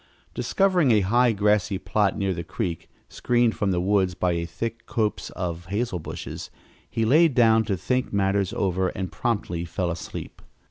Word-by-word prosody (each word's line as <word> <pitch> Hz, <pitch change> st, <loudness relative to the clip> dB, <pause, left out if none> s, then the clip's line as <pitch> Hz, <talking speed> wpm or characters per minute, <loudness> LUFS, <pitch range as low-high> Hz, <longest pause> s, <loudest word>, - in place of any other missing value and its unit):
Discovering 185 Hz, -7 st, +2 dB
a 110 Hz, -3 st, +5 dB
high, 120 Hz, +6 st, +3 dB
grassy 105 Hz, -2 st, +1 dB
plot 100 Hz, +2 st, 0 dB
near 100 Hz, -2 st, 0 dB
the 85 Hz, -1 st, -5 dB
creek, 85 Hz, -2 st, -4 dB, 0.2 s
screened 120 Hz, -2 st, +1 dB
from 100 Hz, -, 0 dB
the 90 Hz, -2 st, +1 dB
woods 95 Hz, -1 st, +1 dB
by 90 Hz, +1 st, +1 dB
a 85 Hz, 0 st, -2 dB
thick 115 Hz, +6 st, -5 dB
copse 110 Hz, -2 st, -1 dB
of 90 Hz, -1 st, -4 dB
hazel 100 Hz, -1 st, -2 dB
bushes, -, -, -7 dB, 0.4 s
he 115 Hz, -, 0 dB
lay 155 Hz, +9 st, +6 dB
down 115 Hz, -5 st, +4 dB
to 100 Hz, -3 st, -1 dB
think 125 Hz, +8 st, -1 dB
matters 100 Hz, -1 st, +1 dB
over 95 Hz, -1 st, 0 dB
and 95 Hz, 0 st, -4 dB
promptly 100 Hz, -8 st, -2 dB
fell 85 Hz, +1 st, -2 dB
asleep. 85 Hz, -, -7 dB
100 Hz, 170 wpm, -25 LUFS, 90-115 Hz, 0.4 s, lay